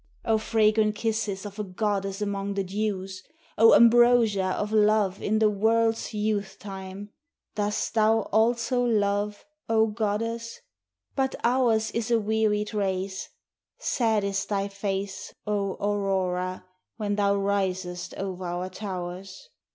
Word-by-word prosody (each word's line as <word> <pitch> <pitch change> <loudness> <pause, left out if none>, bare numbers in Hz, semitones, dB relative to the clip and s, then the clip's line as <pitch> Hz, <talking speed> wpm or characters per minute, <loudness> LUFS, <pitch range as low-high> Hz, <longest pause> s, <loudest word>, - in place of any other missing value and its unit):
O 225 -2 +2
fragrant 215 -1 +2
kisses 215 -3 -2
of 205 +1 -8
a - - -1
goddess 195 0 -2
among 200 0 -3
the 195 - 0
dews! 190 -1 -3 0.3
O 225 +1 +7
ambrosia 235 -4 +5
of 210 0 -2
love 210 -2 +3
in 215 +1 +1
the 215 0 +4
world's 225 +2 +1
youth 210 -2 -2
time! 195 0 -8 0.4
Dost 210 0 -1
thou 220 0 +3
also 235 +3 +2
love, 205 -2 0 0.2
O 220 -1 +4
Goddess? 230 - -3 0.6
But 265 -1 0
ours 235 -3 +2
is 230 0 -2
a 235 -1 +3
wearied 210 -1 0
race; 190 -2 -2 0.5
Sad 225 - +1
is 200 0 -1
thy 200 -1 -1
face, 195 -1 -4
O 200 -2 -1
Aurora, 190 -3 -1 0.3
when 205 -2 -1
thou 200 -1 +2
risest 190 -3 -2
over 190 -1 -5
our 175 +2 -3
towers. 185 - -7
205 Hz, 130 wpm, -26 LUFS, 195-220 Hz, 0.6 s, O